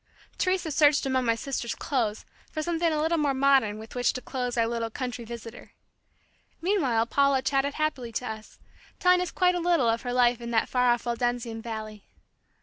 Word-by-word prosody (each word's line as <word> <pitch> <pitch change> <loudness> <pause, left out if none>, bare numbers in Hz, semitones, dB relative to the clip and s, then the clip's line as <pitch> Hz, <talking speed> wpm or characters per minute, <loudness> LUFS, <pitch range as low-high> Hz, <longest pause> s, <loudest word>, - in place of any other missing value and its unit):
Teresa 370 -4 0
searched 290 -1 +4
among 260 -1 +1
my 230 -1 +2
sister's 235 -1 -3
clothes 225 -7 -2 0.3
for 310 - -3
something 335 0 0
a 305 - 0
little 325 +2 +1
more 285 -2 +1
modern 265 -6 +3
with 220 +1 -10
which 245 -1 +1
to 255 - -5
clothe 250 -2 -3
our 230 - +3
little 230 0 -2
country 245 +1 -5
visitor. 235 0 -9 0.9
Meanwhile 285 - +1
Paula 275 +1 +2
chatted 275 +1 0
happily 280 -6 -2
to 250 - -3
us, 220 -2 -8 0.4
telling 360 -1 +4
us 360 - -2
quite 360 -1 +2
a 355 - -1
little 340 -7 +2
of 230 0 +1
her 245 - -4
life 245 -1 +3
in 235 - -5
that 225 -2 +1
far 250 -1 +2
off 240 0 +1
Waldensian 240 -1 -2
valley. 215 -2 -7
250 Hz, 190 wpm, -27 LUFS, 230-295 Hz, 0.9 s, searched